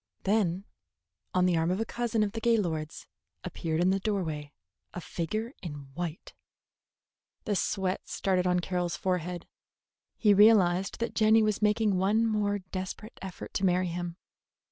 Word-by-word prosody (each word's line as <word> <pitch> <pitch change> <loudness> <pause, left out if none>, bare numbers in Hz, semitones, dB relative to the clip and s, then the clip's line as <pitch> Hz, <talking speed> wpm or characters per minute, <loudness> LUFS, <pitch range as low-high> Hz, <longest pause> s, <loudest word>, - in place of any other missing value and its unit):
Then, 195 -2 +1 0.7
on 180 0 +4
the 180 -1 +3
arm 165 +1 +1
of 185 +2 0
a 225 - 0
cousin 235 -2 0
of 205 - -1
the 225 - -5
Gaylords, 175 -10 0 0.4
appeared 160 -1 -3
in 180 +2 +3
the 195 - +1
doorway 165 -8 -2 0.4
a - - -3
figure 215 +7 -3
in 145 -6 -8
white. 170 +1 -5 1.1
The 205 - 0
sweat 190 -1 -1
started 185 -2 0
on 180 0 +2
Carroll's 175 -1 -2
forehead. 180 -2 -2 0.7
He 210 -2 +5
realized 195 -3 +4
that 235 - -1
Jenny 220 0 +5
was 215 -1 0
making 210 -2 +2
one 210 +4 +3
more 210 -2 +1
desperate 190 +3 -7
effort 190 -2 -8
to 195 - -2
marry 180 -1 +2
him. 175 0 -4
190 Hz, 150 wpm, -29 LUFS, 175-210 Hz, 1.1 s, He